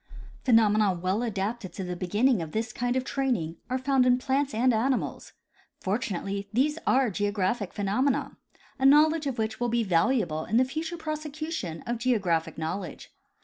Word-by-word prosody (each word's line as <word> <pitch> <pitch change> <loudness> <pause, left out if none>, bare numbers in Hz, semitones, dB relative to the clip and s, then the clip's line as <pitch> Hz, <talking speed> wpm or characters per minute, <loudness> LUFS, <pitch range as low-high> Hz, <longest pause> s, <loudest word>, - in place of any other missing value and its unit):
Phenomena 215 -4 +4
well 185 +5 -1
adapted 210 -3 -3
to 190 - -5
the 180 0 -4
beginning 205 +5 +1
of 160 -2 -6
this 220 +1 -2
kind 245 +1 -1
of 260 - +1
training 245 - -1
are 255 - 0
found 265 0 +2
in 250 0 +5
plants 270 +2 0
and 245 +2 +2
animals. 250 +4 -1 0.5
Fortunately 200 -1 -3
these 295 +7 +1
are 260 -3 +3
geographic 205 +1 -1
phenomena, 215 +7 0 0.4
a 265 - +1
knowledge 305 +2 +5
of 260 -3 -3
which 220 0 -2
will 240 0 0
be 235 0 +1
valuable 175 -3 +1
in 225 - +1
the 255 - +5
future 320 +5 -4
prosecution 310 - -5
of 240 -1 -2
geographic 195 -10 0
knowledge. 165 +2 -5
230 Hz, 160 wpm, -27 LUFS, 195-265 Hz, 0.5 s, in